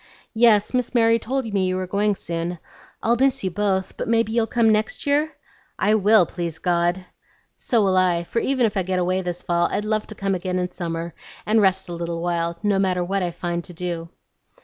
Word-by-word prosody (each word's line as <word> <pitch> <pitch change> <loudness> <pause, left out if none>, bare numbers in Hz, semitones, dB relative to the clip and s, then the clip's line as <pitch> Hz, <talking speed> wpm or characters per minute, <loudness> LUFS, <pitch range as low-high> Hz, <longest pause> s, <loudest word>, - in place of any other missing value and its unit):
"Yes, 220 -2 +4
Miss 250 0 -1
Mary 230 -1 +4
told 265 +3 -2
me 190 -2 +1
you 185 - 0
were 185 0 -2
going 205 +2 +1
soon. 170 0 -4 0.5
I'll 235 +1 +3
miss 270 0 +1
you 190 - -1
both, 190 0 -1
but - - -3
maybe 230 -1 +2
you'll 225 -1 +1
come 230 -2 +3
next 215 0 -1
year?" 295 +2 +1 0.4
"I 210 - +2
will, 215 -2 +5
please 170 -2 -5
God!" 175 +1 0 0.5
"So 230 -4 +1
will 190 -1 +2
I; 180 -2 +2
for 230 - -2
even 260 0 +1
if 215 - -1
I 195 - +1
get 185 0 -2
away 185 +1 +1
this 175 -1 -5
fall, 175 0 +1
I'd 210 - -1
love 215 0 -1
to 215 - -9
come 195 0 -1
again 185 0 -2
in 180 0 -2
summer 170 -1 -4 0.3
and 215 +1 +3
rest 190 -1 +2
a 175 - -6
little 170 0 -4
while, 170 -1 -1
no 205 -2 +2
matter 185 -2 +1
what 195 +2 -1
I 180 - 0
find 175 0 -4
to 180 - -11
do." 170 -1 -4
190 Hz, 215 wpm, -23 LUFS, 175-220 Hz, 0.5 s, will